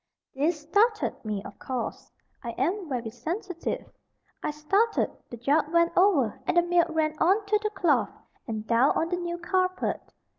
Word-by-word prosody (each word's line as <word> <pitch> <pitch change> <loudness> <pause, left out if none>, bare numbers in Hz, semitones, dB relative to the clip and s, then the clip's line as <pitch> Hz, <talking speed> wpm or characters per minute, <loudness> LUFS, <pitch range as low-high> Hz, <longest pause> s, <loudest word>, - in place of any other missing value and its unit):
This 305 +4 0
startled 425 +8 +1
me, 210 -3 -3
of 200 - -11
course. 250 -3 -4 0.3
I 235 -1 -4
am 350 +5 -1
very 240 -4 -3
sensitive. 345 - -4 0.5
I - - -1
started, 390 +10 +1 0.2
the 240 - -7
jug 290 +5 +1
went 335 0 +3
over, 280 - +3
and - - +1
the 345 - +6
milk 345 0 +3
ran 315 -1 0
on 390 +5 +3
to 420 +1 +2
the 425 - 0
cloth, 390 -5 +2 0.4
and 220 -2 -4
down 235 +5 +4
on 330 - 0
the 355 - 0
new 345 -1 -3
carpet. 370 +1 0
335 Hz, 170 wpm, -27 LUFS, 265-370 Hz, 0.5 s, the